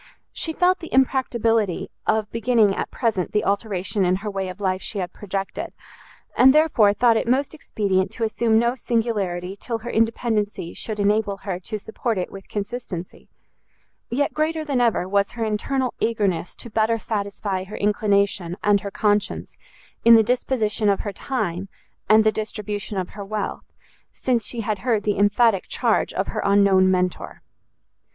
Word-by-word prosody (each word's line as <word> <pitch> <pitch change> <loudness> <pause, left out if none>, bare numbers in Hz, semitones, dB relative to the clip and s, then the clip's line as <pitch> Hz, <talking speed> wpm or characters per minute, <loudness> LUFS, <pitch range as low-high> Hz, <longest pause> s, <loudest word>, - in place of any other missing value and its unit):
She 325 - -1
felt 360 +3 +2
the 330 - -9
impracticability 235 -7 +1 0.2
of 215 -1 +1
beginning 230 -3 +2
at - - -3
present 220 -7 -1
the 210 - +1
alteration 200 -1 -1
in 180 0 +3
her 210 - -2
way 195 -1 -3
of 185 +2 -9
life 190 -1 -1
she 210 - -5
had 180 -2 -3
projected, 195 -1 -5 0.6
and 265 +3 +6
therefore 295 -10 +5
thought 230 +2 +3
it - - -1
most 265 +5 +1
expedient 195 -10 -1
to 235 - -4
assume 220 0 +2
no 235 +1 +2
singularity 205 -7 -2
till 230 +3 -4
her 230 +2 -6
independency 220 -5 0
should 215 -2 -5
enable 205 0 +1
her 185 -3 -3
to 215 +4 -5
support 220 +1 -3
it 180 - -3
with 195 -1 -10
consistency; 205 -4 -6 0.8
yet 280 +4 0
greater 310 +1 -1
than 275 -4 0
ever 225 -6 +2
was 200 +1 +1
her 230 -2 -2
internal 250 +4 -1
eagerness 200 -7 0
to 235 - -10
better 225 +1 +2
satisfy 200 -3 -3
her 195 +3 -8
inclination 200 -3 +1
and 205 -1 +3
her 200 - -5
conscience 205 0 -1 0.5
in 230 0 +9
the 225 - +6
disposition 225 -3 0
of 200 - +1
her 205 - -5
time, 195 -6 -3 0.4
and 215 +1 +7
the 215 - +4
distribution 210 -1 -4
of 185 -1 -2
her 205 - -8
wealth, 210 0 -5 0.4
since 245 -3 -1
she 235 - -3
had 210 -2 -2
heard 225 -2 0
the 205 -1 0
emphatic 205 0 +3
charge - - +1
of - - -2
her - - -3
unknown 200 -2 +4
Mentor. 180 -1 -1
210 Hz, 165 wpm, -23 LUFS, 195-235 Hz, 0.8 s, in